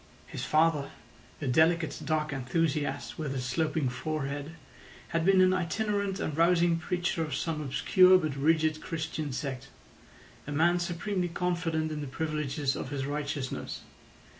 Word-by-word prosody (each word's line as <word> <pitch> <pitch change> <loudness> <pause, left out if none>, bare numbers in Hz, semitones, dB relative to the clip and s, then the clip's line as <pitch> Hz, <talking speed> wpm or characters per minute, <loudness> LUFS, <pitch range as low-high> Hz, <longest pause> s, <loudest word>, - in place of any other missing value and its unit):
His - - -6
father, 155 -2 +2 0.5
a 145 - -4
delicate 160 +5 +2
dark 155 0 0
enthusiast 145 +5 -1
with 145 -3 -3
a - - -1
sloping 145 +3 0
forehead, 145 +3 -3 0.5
had 165 0 0
been 190 +1 +5
an 185 0 +5
itinerant 200 +2 -1
and 155 - -2
rousing 170 0 +3
preacher 175 -1 -1
of 155 -4 -2
some 160 -2 -2
obscure 185 +6 +5
but 155 -6 -2
rigid 155 +2 +2
Christian 160 -3 -4
sect—a 135 +1 -9
man 170 +4 +3
supremely 175 +1 -2
confident 170 -2 -1
in 150 -1 -4
the 145 - -4
privileges 150 -1 -2
of - - -5
his 140 -2 -3
righteousness. 145 -2 -4
155 Hz, 140 wpm, -29 LUFS, 145-170 Hz, 0.5 s, been